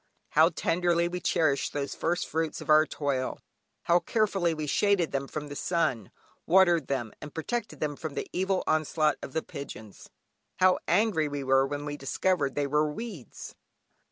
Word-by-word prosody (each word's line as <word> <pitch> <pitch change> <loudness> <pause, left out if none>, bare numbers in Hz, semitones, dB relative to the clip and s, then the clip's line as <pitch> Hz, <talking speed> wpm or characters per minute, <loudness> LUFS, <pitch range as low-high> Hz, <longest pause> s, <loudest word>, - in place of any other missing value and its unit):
How 160 +2 +5
tenderly 170 0 +1
we 180 +1 -4
cherished 155 -5 +1
these 140 -1 -3
first 175 +2 -1
fruits 160 -1 -2
of - - -2
our 155 +1 +6
toil; 135 -3 -2 0.4
how 170 +1 +4
carefully 200 -5 +1
we 155 -1 -3
shaded 190 +2 +2
them 135 0 -2
from 150 +1 -5
the 145 - -7
sun, 140 - -1 0.4
watered 175 -4 +4
them, 120 -5 -2
and 150 - -9
protected 220 +8 -3
them 150 -1 -1
from 155 -2 -6
the - - -3
evil 190 +1 0
onslaught 155 -1 +1
of 135 - -8
the 160 - -1
pigeons. 110 -7 -9 0.5
How 185 0 +4
angry 180 -4 +2
we 145 -1 -4
were 135 0 +3
when 145 +1 -4
we 145 0 -4
discovered 140 0 0
they 145 - 0
were 150 +2 +1
weeds. 200 - -8
155 Hz, 170 wpm, -28 LUFS, 145-175 Hz, 0.5 s, our